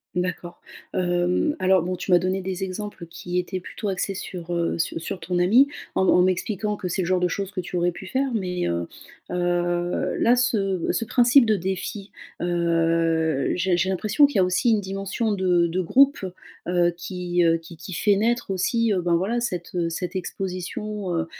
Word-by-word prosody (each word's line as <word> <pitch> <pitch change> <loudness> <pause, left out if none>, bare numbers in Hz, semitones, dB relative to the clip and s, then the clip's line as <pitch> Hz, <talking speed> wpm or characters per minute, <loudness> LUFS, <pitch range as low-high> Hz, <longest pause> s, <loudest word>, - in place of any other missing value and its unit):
D'accord. 180 -1 -3 0.3
Hem, 180 - +1
alors 185 -2 +3
bon 180 +1 -2
tu 180 - -4
m'as 175 - +7
donné 185 +2 -1
des 190 0 -3
exemples 195 -1 -6
qui 175 +2 -3
étaient 185 +1 -4
plutôt 210 +3 -6
axés 195 +1 -1
sur, 175 -2 -6
heu, 170 0 0
sur 165 0 -2
sur 180 +3 -5
ton 175 +2 -1
ami, 235 +11 +5 0.3
en 190 - +2
en 180 - +5
m'expliquant 200 +3 0
que 185 -3 -5
c'est 180 - -1
le - - -1
genre 185 0 +1
de 180 - +2
choses 195 +2 -3
que 190 -2 -3
tu 180 0 -5
aurais 175 0 +2
pu 190 - -9
faire, 265 +5 0
mais, 180 -5 -1
heu, 85 0 -2 0.4
heu, 175 0 0
là, 240 - +5
ce 200 -8 0
ce 230 - -1
principe 245 +3 +5
de 220 -1 +3
défi, 190 +2 -4 0.3
heu, 165 -3 +1
j'ai 180 0 +1
j'ai 180 +2 +1
l'impression 210 +9 +3
qu'il 285 - -2
y - - +4
a 185 - +5
aussi 185 +6 +2
une 210 -2 +2
dimension 195 +3 -2
de 180 -3 +2
de 175 +2 -2
groupe, 275 +10 +4 0.5
heu, 175 -1 +2
qui, 175 0 -1
heu, 165 0 +4
qui 165 0 -13
qui 170 +4 -8
fait 200 +3 +2
naître 235 +1 0
aussi, 225 +5 +1
heu, 190 -3 +1
ben, 175 -1 +2
voilà, 205 +8 0
cette, 180 -8 -4
heu, 170 -1 0
cette 180 +2 -4
exposition, 190 +1 -4
heu, 165 - 0
185 Hz, 200 wpm, -24 LUFS, 175-200 Hz, 0.5 s, m'as